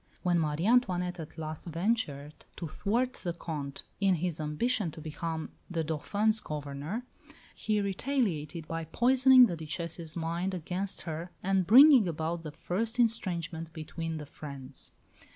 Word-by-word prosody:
When 175 Hz, -2 st, +3 dB
Marie 155 Hz, +2 st, 0 dB
Antoinette 180 Hz, -7 st, +2 dB
at 160 Hz, +1 st, -8 dB
last 155 Hz, -1 st, -6 dB
ventured 165 Hz, -5 st, -1 dB, 0.2 s
to 170 Hz, -, -5 dB
thwart 240 Hz, +10 st, 0 dB
the 175 Hz, -3 st, -1 dB
Comte 150 Hz, -5 st, -5 dB, 0.2 s
in 195 Hz, -2 st, +4 dB
his 170 Hz, -1 st, -2 dB
ambition 190 Hz, +7 st, 0 dB
to 160 Hz, -, -10 dB
become 160 Hz, +1 st, -4 dB, 0.2 s
the 165 Hz, -3 st, -1 dB
Dauphin's 205 Hz, +8 st, +1 dB
Governor, 150 Hz, -, -4 dB, 0.5 s
he 215 Hz, -1 st, 0 dB
retaliated 190 Hz, -, -1 dB
by 165 Hz, 0 st, -3 dB
poisoning 255 Hz, -, +6 dB
the 175 Hz, -, -2 dB
Duchesse's 165 Hz, +1 st, -5 dB
mind 170 Hz, +3 st, -1 dB
against 180 Hz, +3 st, -3 dB
her, 165 Hz, +1 st, -5 dB
and 190 Hz, -1 st, +2 dB
bringing 260 Hz, -1 st, +9 dB
about 165 Hz, +1 st, -2 dB
the 155 Hz, -2 st, -7 dB
first 225 Hz, +10 st, -3 dB
estrangement 170 Hz, -8 st, 0 dB
between 165 Hz, 0 st, -5 dB
the 150 Hz, -, -6 dB
friends. 140 Hz, -2 st, -9 dB
170 Hz, 140 wpm, -30 LUFS, 155-205 Hz, 0.5 s, bringing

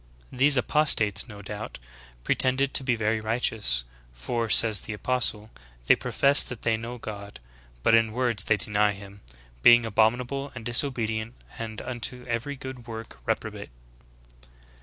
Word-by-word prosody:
These 135 Hz, +2 st, +3 dB
apostates, 115 Hz, -8 st, +3 dB
no 100 Hz, -2 st, -11 dB
doubt, 105 Hz, +2 st, -7 dB, 0.5 s
pretended 130 Hz, -, +2 dB
to -, -, 0 dB
be 130 Hz, -2 st, +1 dB
very 110 Hz, 0 st, -1 dB
righteous; 110 Hz, -, 0 dB, 0.3 s
for, 110 Hz, -, -4 dB
says 105 Hz, -2 st, +5 dB
the 105 Hz, -, -7 dB
apostle, 110 Hz, -1 st, -2 dB, 0.3 s
'they -, -, +5 dB
profess 140 Hz, +1 st, +4 dB
that 125 Hz, -3 st, -7 dB
they 115 Hz, -1 st, +1 dB
know 115 Hz, +2 st, -7 dB
God: 100 Hz, -, -9 dB, 0.4 s
but -, -, +3 dB
in 115 Hz, -1 st, +3 dB
words 115 Hz, -4 st, 0 dB
they 105 Hz, -, +2 dB
deny 105 Hz, -1 st, +1 dB
Him, 100 Hz, 0 st, -13 dB, 0.4 s
being 120 Hz, -, +7 dB
abom 110 Hz, +1 st, +2 dB
inable 135 Hz, +3 st, -6 dB
and 120 Hz, -3 st, -9 dB
disobedient 115 Hz, -3 st, -1 dB, 0.2 s
and 110 Hz, -2 st, -6 dB
unto 125 Hz, 0 st, -5 dB
every 120 Hz, +5 st, -3 dB
good 130 Hz, -3 st, -10 dB
work 115 Hz, -1 st, -9 dB
reprobate.' -, -, -4 dB
115 Hz, 145 wpm, -25 LUFS, 105-125 Hz, 0.5 s, being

